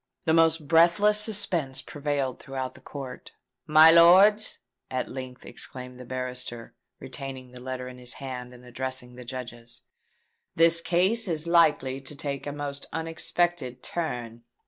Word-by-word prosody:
The 160 Hz, -, +3 dB
most 165 Hz, -2 st, +3 dB
breathless 170 Hz, +6 st, +5 dB
suspense 185 Hz, -11 st, +1 dB
prevailed 145 Hz, -3 st, -3 dB
throughout 130 Hz, -1 st, -5 dB
the 130 Hz, -, -16 dB
court. 130 Hz, -2 st, -9 dB, 0.3 s
"My 155 Hz, +1 st, +8 dB
lords," 190 Hz, +6 st, +6 dB, 0.3 s
at 130 Hz, -1 st, -2 dB
length 130 Hz, -1 st, -8 dB
exclaimed 125 Hz, -1 st, -7 dB
the 125 Hz, -, -9 dB
barrister, 125 Hz, -2 st, -5 dB, 0.3 s
retaining 130 Hz, -2 st, -7 dB
the 125 Hz, 0 st, -10 dB
letter 130 Hz, 0 st, -5 dB
in 125 Hz, 0 st, -10 dB
his 125 Hz, -1 st, -2 dB
hand, 125 Hz, -2 st, -7 dB
and 125 Hz, 0 st, -15 dB
addressing 125 Hz, 0 st, -5 dB
the 125 Hz, 0 st, -10 dB
Judges, 120 Hz, -1 st, -6 dB, 0.7 s
"this 165 Hz, +1 st, +4 dB
case 190 Hz, +7 st, +2 dB
is 160 Hz, -2 st, -2 dB
likely 150 Hz, -6 st, +3 dB
to 135 Hz, +2 st, -9 dB
take 140 Hz, 0 st, -5 dB
a -, -, -2 dB
most 145 Hz, -1 st, -6 dB
unexpected 160 Hz, -4 st, -2 dB
turn." 120 Hz, -9 st, -4 dB
135 Hz, 145 wpm, -26 LUFS, 125-165 Hz, 0.7 s, My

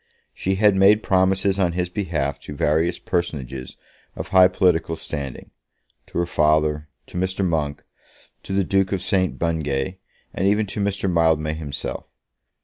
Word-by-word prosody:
She 95 Hz, +1 st, -1 dB
had 105 Hz, 0 st, +4 dB
made 100 Hz, +3 st, +5 dB
promises 95 Hz, +1 st, +2 dB
on 90 Hz, -3 st, +2 dB
his 90 Hz, +1 st, -1 dB
behalf 80 Hz, -7 st, -2 dB
to 75 Hz, +1 st, -9 dB
various 80 Hz, +5 st, +1 dB
personages 70 Hz, -8 st, -4 dB, 0.4 s
of -, -, -6 dB
high 95 Hz, -1 st, +7 dB
political 90 Hz, -3 st, +1 dB
standing, 70 Hz, -5 st, -6 dB, 0.6 s
to -, -, -7 dB
her 85 Hz, -, +2 dB
father, 75 Hz, -1 st, +1 dB, 0.2 s
to 90 Hz, -, -6 dB
Mr. 95 Hz, +1 st, -1 dB
Monk, 75 Hz, -4 st, -2 dB, 0.6 s
to -, -, -9 dB
the 100 Hz, 0 st, +2 dB
Duke 95 Hz, +1 st, +1 dB
of 95 Hz, -2 st, -2 dB
St. 95 Hz, -1 st, 0 dB
Bungay, 80 Hz, +1 st, -2 dB, 0.3 s
and 95 Hz, -, 0 dB
even 105 Hz, +2 st, +2 dB
to 100 Hz, -, -6 dB
Mr. 100 Hz, -1 st, 0 dB
Mildmay 80 Hz, -3 st, +2 dB
himself. 75 Hz, -3 st, -5 dB
85 Hz, 150 wpm, -22 LUFS, 75-95 Hz, 0.6 s, high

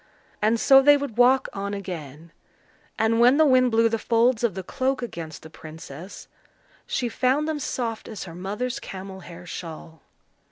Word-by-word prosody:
And 220 Hz, +2 st, +2 dB
so 270 Hz, +3 st, +7 dB
they 290 Hz, +1 st, +6 dB
would 280 Hz, -6 st, -6 dB
walk 255 Hz, +2 st, +4 dB
on 200 Hz, +1 st, -4 dB
again; 165 Hz, -5 st, -8 dB, 0.7 s
and 225 Hz, +1 st, +2 dB
when 245 Hz, +4 st, +6 dB
the 315 Hz, -, +5 dB
wind 255 Hz, -3 st, +4 dB
blew 230 Hz, 0 st, +3 dB
the 225 Hz, 0 st, -1 dB
folds 235 Hz, +1 st, +2 dB
of 225 Hz, -6 st, +1 dB
the 190 Hz, -, -5 dB
cloak 260 Hz, +5 st, -2 dB
against 165 Hz, -9 st, -7 dB
the 160 Hz, -, -11 dB
princess, 160 Hz, +2 st, -10 dB, 0.6 s
she 250 Hz, -, -1 dB
found 265 Hz, +5 st, +1 dB
them 310 Hz, -1 st, -2 dB
soft 230 Hz, -5 st, -4 dB
as 215 Hz, -4 st, -7 dB
her 170 Hz, -, -9 dB
mother's 210 Hz, +8 st, -4 dB
camel 190 Hz, 0 st, -8 dB
hair 175 Hz, -1 st, -11 dB
shawl. 165 Hz, -2 st, -9 dB
225 Hz, 170 wpm, -24 LUFS, 180-255 Hz, 0.7 s, so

